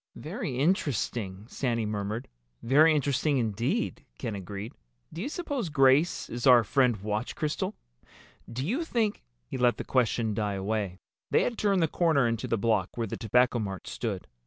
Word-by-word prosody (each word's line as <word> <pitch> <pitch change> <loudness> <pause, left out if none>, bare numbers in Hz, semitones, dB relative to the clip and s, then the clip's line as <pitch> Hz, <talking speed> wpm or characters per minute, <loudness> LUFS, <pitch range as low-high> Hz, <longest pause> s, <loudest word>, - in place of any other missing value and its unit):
"Very 125 - -4
interesting," 120 - 0
Sandy 120 -3 -1
murmured. 105 +3 -3 0.4
"Very 155 +6 +5
interesting 145 0 +1
indeed," 120 - -1
Ken 115 -4 -4
agreed. 100 +3 -6 0.4
"Do 165 - -5
you 270 - -2
suppose 285 - -3
Grace 140 +3 +3
is 120 +2 -2
our 125 -2 +8
friend 125 -1 +2
Watch 105 +3 -3
Crystal? 150 -1 -2 0.8
Do 130 +4 -3
you 255 - 0
think—?" 230 -9 0 0.2
He 125 - -5
let 125 -1 +3
the - - -4
question 115 -3 +1
die 105 -1 -1
away. 100 -1 -2 0.3
They - - +3
had 245 - -1
turned 200 -5 +2
the - - +3
corner 155 -6 +2
into 115 -1 -2
the 115 - +1
block 110 -3 0
where 115 - 0
the 100 - -4
Tobacco 125 +2 +2
Mart 95 -3 -4
stood. 105 -6 -4
120 Hz, 165 wpm, -28 LUFS, 110-150 Hz, 0.8 s, our